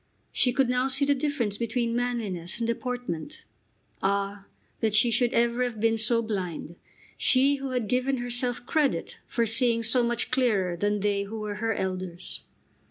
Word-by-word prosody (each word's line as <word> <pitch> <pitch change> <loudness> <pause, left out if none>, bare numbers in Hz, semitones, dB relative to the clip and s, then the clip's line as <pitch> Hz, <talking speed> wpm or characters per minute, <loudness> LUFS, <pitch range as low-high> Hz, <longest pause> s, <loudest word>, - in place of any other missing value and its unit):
She 250 - +2
could 265 +1 +2
now 250 +1 +1
see 270 +2 +1
the 285 - +4
difference 265 -7 -1
between 235 0 -1
manliness 220 -8 -2
and 235 - -1
"deportment." 245 - -4 0.6
Ah, 200 0 -1 0.3
that 220 -2 +1
she 235 +2 +5
should 245 +1 +2
ever 235 +1 +2
have 240 -3 -3
been 225 +1 +2
so 230 +1 +2
blind, 180 -6 -4 0.4
she 275 +2 +4
who 270 0 -5
had 250 -4 -1
given 255 +4 +1
herself 245 0 -1
credit 295 +1 0
for 235 -2 0
seeing 230 +1 +3
so 230 +3 +3
much 235 -1 -1
clearer 215 -9 +2
than 205 +3 0
they 200 0 +1
who 220 +2 -6
were 210 -1 -4
her 225 -1 0
elders! 185 -2 -4
235 Hz, 165 wpm, -27 LUFS, 205-250 Hz, 0.6 s, she